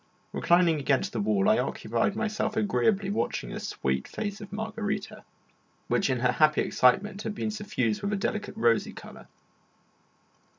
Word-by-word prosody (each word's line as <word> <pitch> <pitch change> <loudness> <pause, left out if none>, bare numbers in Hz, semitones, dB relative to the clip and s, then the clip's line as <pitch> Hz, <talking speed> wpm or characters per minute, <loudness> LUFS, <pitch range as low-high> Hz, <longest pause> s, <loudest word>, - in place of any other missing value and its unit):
Reclining 170 -3 +3
against 135 -1 0
the 115 - -2
wall, 100 -2 +2
I - - +4
occupied 115 - -1
myself 215 -1 -2
agreeably 200 - +1
watching - - -2
the - - -5
sweet 65 0 -2
face 205 -1 -5
of 205 - -9
Margarita, 215 -1 -4 0.7
which 195 - +2
in 130 -2 0
her 125 0 +3
happy 155 +3 +3
excitement 195 +11 +2
had 215 - -4
become 215 - -2
suffused 130 - -1
with 200 - -2
a - - +1
delicate 210 0 -3
rosy 115 -1 +2
colour. - - -12
195 Hz, 155 wpm, -28 LUFS, -, 0.7 s, I